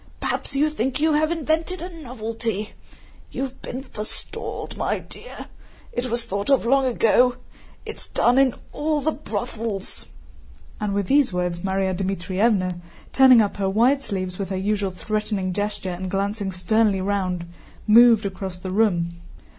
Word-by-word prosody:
Perhaps 280 Hz, -, -2 dB
you 300 Hz, +2 st, +2 dB
think 265 Hz, -1 st, -1 dB
you 315 Hz, +1 st, +3 dB
have 310 Hz, +2 st, +2 dB
invented 325 Hz, +2 st, -1 dB
a 355 Hz, 0 st, -7 dB
novelty? 225 Hz, -4 st, -4 dB, 0.6 s
You -, -, -3 dB
have 265 Hz, -1 st, -6 dB
been 255 Hz, +2 st, -6 dB
forestalled, 215 Hz, -5 st, -5 dB
my -, -, 0 dB
dear! -, -, -10 dB, 0.5 s
It 250 Hz, +1 st, -2 dB
was 235 Hz, 0 st, 0 dB
thought 200 Hz, 0 st, -3 dB
of 275 Hz, -4 st, +4 dB
long 270 Hz, +2 st, +3 dB
ago. 245 Hz, +1 st, +3 dB, 0.5 s
It -, -, -7 dB
is -, -, -12 dB
done 245 Hz, +2 st, +3 dB
in 265 Hz, -3 st, +4 dB, 0.2 s
all 300 Hz, 0 st, 0 dB
the 315 Hz, -, +1 dB
brothels," 220 Hz, -6 st, -4 dB, 0.7 s
and 205 Hz, -1 st, -1 dB
with 200 Hz, -1 st, 0 dB
these 280 Hz, +2 st, +3 dB
words 180 Hz, -1 st, -1 dB
Márya 190 Hz, 0 st, 0 dB
Dmítrievna, 185 Hz, 0 st, 0 dB, 0.3 s
turning 260 Hz, -3 st, +8 dB
up 205 Hz, -, -3 dB
her 195 Hz, -1 st, 0 dB
wide 245 Hz, +8 st, +3 dB
sleeves 185 Hz, -6 st, -4 dB
with 195 Hz, -, -3 dB
her 190 Hz, -, -2 dB
usual 200 Hz, 0 st, 0 dB
threatening 200 Hz, 0 st, -2 dB
gesture 205 Hz, -1 st, -2 dB
and 185 Hz, +1 st, -5 dB
glancing 200 Hz, +1 st, -1 dB
sternly 200 Hz, +2 st, +2 dB
round, 185 Hz, -3 st, -1 dB, 0.4 s
moved 230 Hz, 0 st, +7 dB
across 190 Hz, -1 st, -4 dB
the 185 Hz, +1 st, -6 dB
room. 170 Hz, -5 st, +1 dB
210 Hz, 155 wpm, -23 LUFS, 190-255 Hz, 0.7 s, turning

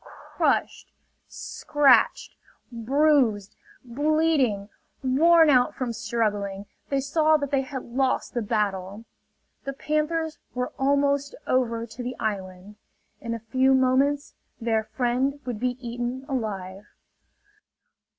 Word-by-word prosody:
Crushed, -, -, -2 dB, 0.4 s
scratched, 275 Hz, -6 st, +2 dB, 0.4 s
bruised, 240 Hz, -4 st, +2 dB, 0.3 s
bleeding, 285 Hz, -5 st, +1 dB, 0.4 s
worn 325 Hz, +5 st, +5 dB
out 250 Hz, -2 st, +3 dB
from 250 Hz, -3 st, -3 dB
struggling, 205 Hz, -4 st, -2 dB, 0.2 s
they 275 Hz, -, +1 dB
saw 310 Hz, +3 st, +3 dB
that 285 Hz, -2 st, -4 dB
they 275 Hz, -1 st, +2 dB
had 265 Hz, -1 st, -6 dB
lost 255 Hz, +2 st, -1 dB
the 240 Hz, -, -1 dB
battle. 205 Hz, -1 st, -2 dB, 0.6 s
The 275 Hz, -, -4 dB
panthers 305 Hz, +3 st, -2 dB, 0.2 s
were 250 Hz, 0 st, -3 dB
almost 280 Hz, +1 st, +1 dB
over 235 Hz, -3 st, 0 dB
to 235 Hz, +2 st, -9 dB
the 245 Hz, +1 st, -4 dB
island. 195 Hz, -1 st, -5 dB, 0.4 s
In 230 Hz, -1 st, -4 dB
a 230 Hz, -, -9 dB
few 265 Hz, 0 st, +4 dB
moments 270 Hz, +3 st, +2 dB, 0.3 s
their 225 Hz, -2 st, 0 dB
friend 250 Hz, +5 st, -1 dB
would 245 Hz, -4 st, -4 dB
be 250 Hz, +1 st, -1 dB
eaten 245 Hz, +2 st, -4 dB
alive! 205 Hz, -7 st, -4 dB
250 Hz, 110 wpm, -25 LUFS, 220-280 Hz, 0.6 s, worn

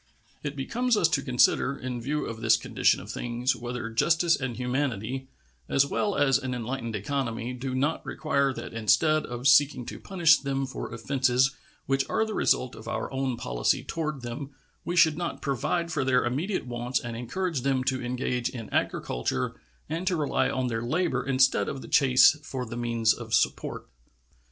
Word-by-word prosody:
It 145 Hz, -1 st, -4 dB
becomes 235 Hz, -, 0 dB
us 170 Hz, -, +4 dB
to 140 Hz, -, +1 dB
consider, 130 Hz, +1 st, +2 dB
in 125 Hz, -1 st, -5 dB
view 150 Hz, +5 st, -2 dB
of 115 Hz, -1 st, -6 dB
this -, -, +5 dB
condition -, -, +2 dB
of -, -, -8 dB
things, 120 Hz, +1 st, -1 dB
whether 120 Hz, -1 st, -5 dB
justice 165 Hz, +8 st, +3 dB
and 130 Hz, -3 st, -4 dB
humanity, 130 Hz, -1 st, -2 dB, 0.4 s
as 140 Hz, -, +4 dB
well 205 Hz, +7 st, -1 dB
as 135 Hz, -2 st, +3 dB
an 130 Hz, -2 st, -3 dB
enlightened 115 Hz, -1 st, -4 dB
economy, 120 Hz, +1 st, -2 dB
do 130 Hz, +1 st, -4 dB
not 145 Hz, +5 st, 0 dB
require 140 Hz, -3 st, 0 dB
that 130 Hz, -, -7 dB
instead 115 Hz, +8 st, +2 dB
of 120 Hz, +2 st, -2 dB
seeking 140 Hz, -2 st, +5 dB
to -, -, -7 dB
punish 170 Hz, -6 st, +4 dB
them 135 Hz, -1 st, -2 dB
for 135 Hz, -, -6 dB
offenses 130 Hz, +2 st, +2 dB, 0.3 s
which 135 Hz, 0 st, 0 dB
are 220 Hz, -, +1 dB
the 220 Hz, -, -5 dB
result 125 Hz, -10 st, +1 dB
of 110 Hz, -, -11 dB
our -, -, -3 dB
own 130 Hz, -2 st, -1 dB
policy -, -, 0 dB
toward 155 Hz, -5 st, -4 dB
them 125 Hz, +4 st, -5 dB, 0.3 s
we 175 Hz, -, -3 dB
should 160 Hz, -3 st, +5 dB
not 175 Hz, -, -3 dB
provide 170 Hz, +5 st, -1 dB
for 155 Hz, -4 st, 0 dB
their 130 Hz, -1 st, +2 dB
immediate 155 Hz, +11 st, -1 dB
wants 125 Hz, +1 st, -2 dB
and 120 Hz, -2 st, -6 dB
encourage 150 Hz, +6 st, -2 dB
them 135 Hz, 0 st, +1 dB
to 130 Hz, 0 st, -1 dB
engage 125 Hz, 0 st, -1 dB
in 115 Hz, -4 st, -8 dB
agriculture 65 Hz, +1 st, -1 dB, 0.3 s
and 165 Hz, +4 st, -4 dB
to 180 Hz, -, +2 dB
rely 150 Hz, -3 st, +1 dB
on 130 Hz, 0 st, -1 dB
their 115 Hz, -2 st, -2 dB
labor 130 Hz, +1 st, 0 dB
instead 130 Hz, 0 st, +2 dB
of 135 Hz, -, -6 dB
the -, -, -9 dB
chase 130 Hz, +1 st, +6 dB
for 130 Hz, -3 st, -5 dB
the 115 Hz, -, -7 dB
means 115 Hz, -2 st, +2 dB
of 115 Hz, -2 st, -2 dB
support. 115 Hz, -, 0 dB
130 Hz, 180 wpm, -27 LUFS, 120-145 Hz, 0.4 s, chase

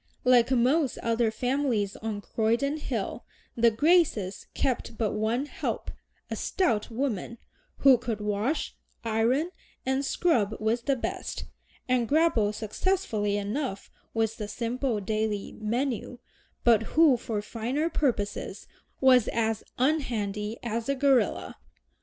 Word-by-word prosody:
Like 250 Hz, -1 st, +5 dB
most 260 Hz, +3 st, +2 dB
other 230 Hz, 0 st, +2 dB
families 245 Hz, -3 st, 0 dB
on 215 Hz, -2 st, -4 dB
Croydon 235 Hz, +8 st, 0 dB
Hill, 235 Hz, -6 st, -3 dB, 0.3 s
the 235 Hz, 0 st, +5 dB
Graces 260 Hz, -, +2 dB
kept 245 Hz, -3 st, -1 dB
but 220 Hz, -3 st, 0 dB
one 220 Hz, +5 st, 0 dB
"help," -, -, -4 dB, 0.4 s
a -, -, -1 dB
stout 235 Hz, -, 0 dB
woman, 235 Hz, -2 st, -2 dB, 0.4 s
who 265 Hz, -3 st, +6 dB
could 225 Hz, -3 st, -3 dB
wash, 210 Hz, +8 st, -1 dB, 0.3 s
iron, 235 Hz, +9 st, +1 dB, 0.3 s
and 265 Hz, +1 st, +1 dB
scrub 240 Hz, -, +1 dB
with 225 Hz, +2 st, 0 dB
the 275 Hz, -, +2 dB
best, 245 Hz, -, -4 dB, 0.4 s
and 250 Hz, -2 st, +2 dB
grapple 285 Hz, -9 st, +3 dB
successfully 215 Hz, -, -1 dB
enough 205 Hz, +1 st, -3 dB, 0.2 s
with 225 Hz, -1 st, 0 dB
the 210 Hz, -, -4 dB
simple 235 Hz, +2 st, -2 dB
daily 215 Hz, 0 st, -2 dB
menu, 245 Hz, +2 st, -2 dB, 0.5 s
but 225 Hz, +2 st, +3 dB
who 315 Hz, -5 st, +7 dB
for 225 Hz, -2 st, -3 dB
finer 245 Hz, +9 st, -2 dB
purposes 245 Hz, -11 st, -2 dB, 0.4 s
was 255 Hz, -4 st, +6 dB
as 225 Hz, -1 st, 0 dB
"unhandy" 230 Hz, -7 st, 0 dB
as 230 Hz, +1 st, -3 dB
a 275 Hz, -, +2 dB
gorilla. 270 Hz, -2 st, +2 dB
235 Hz, 125 wpm, -28 LUFS, 215-270 Hz, 0.5 s, who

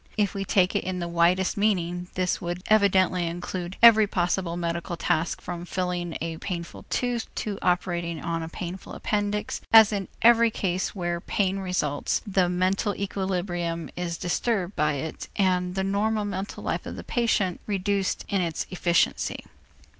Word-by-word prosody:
If 205 Hz, -2 st, +1 dB
we 195 Hz, -, -2 dB
take 185 Hz, -1 st, +2 dB
it -, -, +1 dB
in 185 Hz, 0 st, -3 dB
the 175 Hz, -1 st, -3 dB
widest 175 Hz, +3 st, +2 dB
meaning, 180 Hz, -4 st, 0 dB
this 180 Hz, -1 st, 0 dB
would 175 Hz, 0 st, -4 dB
evidently 190 Hz, -4 st, +4 dB
include 175 Hz, +1 st, -5 dB
every 220 Hz, -2 st, +9 dB
possible 175 Hz, -2 st, -1 dB
medical 170 Hz, 0 st, -3 dB
task 165 Hz, 0 st, 0 dB
from 175 Hz, -1 st, -5 dB
filling 180 Hz, -2 st, -2 dB
a 165 Hz, 0 st, -3 dB
painful 170 Hz, -1 st, -6 dB
tooth 245 Hz, -2 st, -1 dB
to 205 Hz, -2 st, -3 dB
operating 175 Hz, -2 st, 0 dB
on 165 Hz, 0 st, -2 dB
a 160 Hz, -, -5 dB
painful 180 Hz, +2 st, -7 dB
appendix, 210 Hz, 0 st, -2 dB
as 220 Hz, -1 st, +8 dB
in 195 Hz, -2 st, -2 dB, 0.2 s
every 235 Hz, 0 st, +7 dB
case 190 Hz, -3 st, -2 dB
where 175 Hz, -2 st, -2 dB
pain 195 Hz, 0 st, 0 dB
results, 180 Hz, -6 st, -1 dB
the 185 Hz, -3 st, +2 dB
mental 185 Hz, +3 st, +1 dB
equilibrium 180 Hz, -4 st, -2 dB
is 175 Hz, -1 st, -3 dB
disturbed 190 Hz, +2 st, -1 dB
by 150 Hz, 0 st, +2 dB
it 150 Hz, +3 st, -5 dB
and 180 Hz, -2 st, +1 dB
the 190 Hz, -, 0 dB
normal 210 Hz, +2 st, 0 dB
mental 195 Hz, 0 st, -5 dB
life -, -, -2 dB
of -, -, -5 dB
the -, -, -7 dB
patient 215 Hz, -7 st, 0 dB
reduced 200 Hz, -1 st, -1 dB
in 195 Hz, -2 st, 0 dB
its 165 Hz, -3 st, -2 dB
efficiency. 175 Hz, -2 st, +1 dB
185 Hz, 160 wpm, -26 LUFS, 175-200 Hz, 0.2 s, every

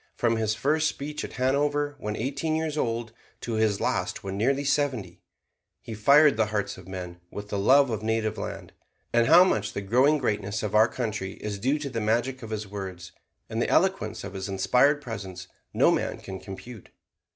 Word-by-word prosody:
From 115 Hz, -1 st, +1 dB
his 110 Hz, -1 st, 0 dB
first 155 Hz, +6 st, +1 dB
speech 150 Hz, 0 st, -4 dB
at -, -, -7 dB
Hanover 145 Hz, +3 st, 0 dB
when 105 Hz, -2 st, -3 dB
eighteen 140 Hz, +7 st, -2 dB
years 160 Hz, -1 st, -1 dB
old, 115 Hz, -5 st, -2 dB, 0.3 s
to 120 Hz, -, -4 dB
his 110 Hz, -2 st, +1 dB
last -, -, -1 dB
when 95 Hz, 0 st, -4 dB
nearly 135 Hz, +7 st, +1 dB
seventy, 135 Hz, -, -1 dB, 0.6 s
he 115 Hz, 0 st, -8 dB
fired 140 Hz, +5 st, +5 dB
the 110 Hz, -1 st, +2 dB
hearts 105 Hz, -1 st, -2 dB
of 95 Hz, -1 st, -13 dB
men 90 Hz, -2 st, -7 dB
with 105 Hz, 0 st, -8 dB
the 100 Hz, -, -2 dB
love 135 Hz, +5 st, +5 dB
of 110 Hz, -2 st, -2 dB
native 110 Hz, -1 st, 0 dB
land. -, -, -6 dB, 0.4 s
And 120 Hz, 0 st, +4 dB
how 170 Hz, +5 st, +8 dB
much 185 Hz, -, 0 dB
the 100 Hz, -, -3 dB
growing 130 Hz, +9 st, +3 dB
greatness 105 Hz, -5 st, -2 dB
of 105 Hz, -, -3 dB
our 110 Hz, +1 st, +6 dB
country 105 Hz, -6 st, -4 dB
is 105 Hz, -2 st, -5 dB
due 135 Hz, +8 st, +1 dB
to 145 Hz, -2 st, -5 dB
the 115 Hz, -2 st, -2 dB
magic 120 Hz, +5 st, 0 dB
of 115 Hz, -, -8 dB
his 110 Hz, -1 st, -4 dB
words 95 Hz, -3 st, -7 dB, 0.4 s
and -, -, -2 dB
the -, -, 0 dB
eloquence -, -, +1 dB
of -, -, -7 dB
his 95 Hz, 0 st, -5 dB
inspired 125 Hz, +9 st, +3 dB
presence 95 Hz, -6 st, -7 dB, 0.2 s
no -, -, +4 dB
man -, -, -1 dB
can 95 Hz, -1 st, -8 dB
compute. 105 Hz, +3 st, -10 dB
110 Hz, 195 wpm, -26 LUFS, 100-140 Hz, 0.6 s, how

